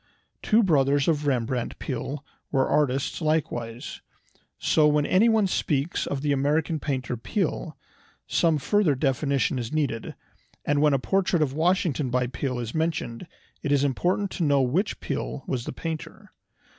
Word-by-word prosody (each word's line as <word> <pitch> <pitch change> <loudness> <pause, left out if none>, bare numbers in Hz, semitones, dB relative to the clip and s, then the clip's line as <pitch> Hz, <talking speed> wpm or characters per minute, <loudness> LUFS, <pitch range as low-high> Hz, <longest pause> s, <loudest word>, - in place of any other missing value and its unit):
Two 225 +2 +4
brothers 140 -5 +3
of 150 -3 +1
Rembrandt 125 -2 -1
Peale 135 +1 -4 0.3
were 135 -2 +2
artists 140 +1 0
likewise. 125 -7 -2 0.6
So 155 -1 +3
when 150 -1 +2
anyone 220 +4 +4
speaks 150 -4 -1
of 140 -1 -3
the 145 - +1
"American 150 +3 +1
painter 130 -4 -2
Peale" 160 - -2 0.5
some 165 -2 +2
further 170 +1 +2
definition 135 -2 0
is 120 -1 -4
needed, 140 -7 -2 0.5
and 145 0 +2
when 150 -2 +4
a - - +3
portrait 180 +2 +1
of 135 -3 -2
Washington 160 -3 +1
by 125 +1 +1
Peale 125 +1 -3
is 120 -2 -4
mentioned 160 -3 -2 0.3
it 145 - -2
is 140 -1 +3
important 180 +8 0
to 175 - -2
know 140 -3 +3
which 170 - 0
Peale 135 - -4
was 125 -3 -3
the - - -4
painter. 160 +3 -6
145 Hz, 150 wpm, -26 LUFS, 130-160 Hz, 0.6 s, Two